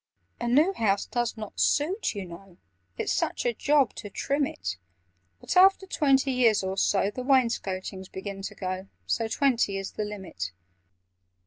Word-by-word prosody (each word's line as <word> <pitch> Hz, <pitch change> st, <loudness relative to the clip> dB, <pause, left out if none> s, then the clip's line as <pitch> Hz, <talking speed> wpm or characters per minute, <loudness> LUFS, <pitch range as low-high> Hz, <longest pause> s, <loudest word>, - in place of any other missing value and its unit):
"A 240 Hz, -, -2 dB
new 300 Hz, +10 st, +4 dB
house 205 Hz, -, +1 dB
does 240 Hz, -1 st, -2 dB
not 215 Hz, -2 st, -7 dB
suit, 345 Hz, -, +1 dB
you 200 Hz, -2 st, -4 dB
know— 175 Hz, +1 st, -12 dB, 0.4 s
It's -, -, -1 dB
such -, -, -1 dB
a 240 Hz, -, +2 dB
job 285 Hz, +1 st, +2 dB
to 205 Hz, -, -6 dB
trim 280 Hz, +7 st, 0 dB
it: 85 Hz, 0 st, -5 dB, 0.6 s
But, -, -, -4 dB
after 385 Hz, +1 st, +6 dB
twenty 275 Hz, -6 st, +2 dB
years 235 Hz, -6 st, +3 dB
or 190 Hz, 0 st, -2 dB
so, 200 Hz, +1 st, +2 dB
The 255 Hz, -, -5 dB
wainscotings 200 Hz, -8 st, 0 dB
begin 195 Hz, +1 st, -6 dB
to -, -, -6 dB
go, 185 Hz, 0 st, -4 dB, 0.2 s
So 225 Hz, -, 0 dB
twenty 235 Hz, -5 st, +1 dB
is 195 Hz, 0 st, -5 dB
the 215 Hz, -, -3 dB
limit." 190 Hz, -, -6 dB
220 Hz, 160 wpm, -27 LUFS, 195-270 Hz, 0.6 s, after